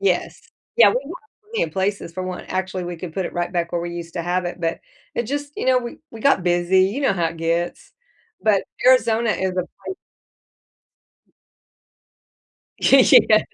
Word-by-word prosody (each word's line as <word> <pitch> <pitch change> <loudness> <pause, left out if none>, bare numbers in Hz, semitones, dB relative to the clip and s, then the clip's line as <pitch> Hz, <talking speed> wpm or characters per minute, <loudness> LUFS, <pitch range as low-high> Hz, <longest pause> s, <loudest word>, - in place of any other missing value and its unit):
yes. 400 - 0 0.4
Yeah, - - +8
we - - -3
want - - -7 0.3
plenty 450 +3 -2
of - - -7
places 190 -3 -2
for 185 - -4
one 185 -1 -5
actually, 185 -1 -3
we 175 -1 -5
could 165 -1 -7
put 190 - -2
it - - -8
right 175 0 -2
back 170 -1 -2
where 175 - 0
we 175 0 -4
used 170 -1 -7
to 170 - -2
have 180 +2 -1
it, 175 0 -5
but, 165 0 -1 0.4
it 235 - -1
just, 285 +4 -4
you - - -3
know 255 -1 +5
we 240 -1 -7
we 225 - -10
got 275 -9 +3
busy, 175 +1 +3
you 210 +9 -2
know 270 -8 +2
how 170 -3 0
it 165 - -5
gets, 165 +1 -2 0.5
but 210 -3 +3 0.2
Arizona 235 -3 +4
is 190 -2 0
a 185 - -8
pla 185 - -5 2.9
Yeah. - - +6
185 Hz, 185 wpm, -21 LUFS, 175-225 Hz, 2.9 s, Yeah